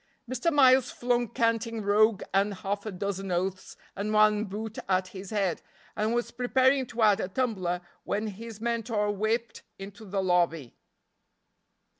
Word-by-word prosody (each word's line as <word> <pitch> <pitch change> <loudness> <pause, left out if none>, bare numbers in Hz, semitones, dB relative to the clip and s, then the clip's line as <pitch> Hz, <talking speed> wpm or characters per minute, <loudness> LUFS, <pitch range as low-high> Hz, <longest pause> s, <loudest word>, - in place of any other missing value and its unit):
Mr. 255 +7 0
Miles 260 -3 +5
flung 240 0 0
canting 230 -1 -1
rogue 210 +1 +3
and 200 +1 +2
half 200 +3 -4
a - - -3
dozen 195 0 -4
oaths 185 +2 -3 0.2
and 205 +2 -3
one 215 0 +4
boot 215 +2 -6
at 185 0 +1
his 190 -1 -9
head, 195 -6 -1 0.3
and 220 +2 0
was 240 - -1
preparing 260 +1 +2
to 230 0 -2
add 210 -2 +5
a - - -1
tumbler, 190 -6 -1 0.2
when 210 +2 -2
his 220 +1 -7
mentor 225 -2 -1
whipped 220 +3 -2 0.2
into 200 +2 -10
the 195 -1 -2
lobby. 170 -7 +1
210 Hz, 150 wpm, -28 LUFS, 195-230 Hz, 0.3 s, Miles